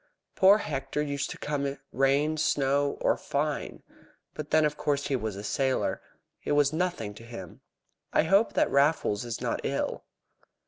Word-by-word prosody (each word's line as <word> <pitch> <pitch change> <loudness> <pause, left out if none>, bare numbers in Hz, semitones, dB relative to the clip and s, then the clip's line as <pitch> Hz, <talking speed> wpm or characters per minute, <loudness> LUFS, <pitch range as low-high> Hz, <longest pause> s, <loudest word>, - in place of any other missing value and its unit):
"Poor 195 +2 +6
Hector 140 -6 -3
used 140 -1 -2
to - - -6
come, 140 -2 -2 0.2
rain, 140 +4 +2
snow, 140 -1 +1
or - - +3
fine. 145 +1 -3 0.5
But, 150 -1 -6
then, 155 0 +4
of 150 0 0
course, 145 -2 -1
he 135 - +1
was 110 -5 -3
a 100 - -7
sailor. 130 +5 0 0.4
It - - 0
was 145 0 +3
nothing 160 - -2
to 110 - -13
him. 115 -8 -10 0.5
I - - +3
hope 195 +7 +3
that - - +2
Raffles 140 -7 +2
is 120 -1 -5
not - - -1
ill." - - -2
140 Hz, 165 wpm, -28 LUFS, 135-150 Hz, 0.5 s, Poor